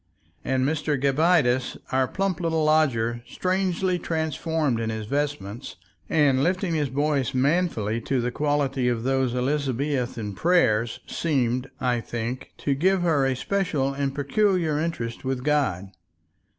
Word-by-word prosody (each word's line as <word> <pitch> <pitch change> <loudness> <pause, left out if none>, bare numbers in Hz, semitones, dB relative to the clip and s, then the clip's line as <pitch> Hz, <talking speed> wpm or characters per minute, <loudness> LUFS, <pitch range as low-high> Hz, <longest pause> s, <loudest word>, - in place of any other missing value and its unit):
And 130 -1 +1
Mr. 150 -1 0
Gabbitas, 140 -2 +2
our 130 0 +2
plump 195 0 -1
little 165 -2 0
lodger, 125 -7 +2
strangely 185 -1 0
transformed 160 -5 -1
in 115 -1 -2
his 110 -1 -4
vestments 130 -7 -3 0.3
and 140 -4 +3
lifting 180 +1 0
his 150 -3 +1
voice 140 -1 0
manfully 130 - +1
to 135 +3 -1
the 120 +1 -1
quality 140 -2 0
of 120 -2 0
those 130 -1 +1
Elizabethan 130 -4 -1
prayers, 120 - +2
seemed, 130 -5 -1
I 125 -2 +1
think, 120 +3 -5
to 140 - 0
give 180 +6 +2
her 150 -6 +2
a 130 - 0
special 150 -4 -1
and 135 -1 -2
peculiar 160 +1 +1
interest 150 -8 -3
with 130 -1 -2
God. 130 -11 0
140 Hz, 135 wpm, -25 LUFS, 125-160 Hz, 0.3 s, and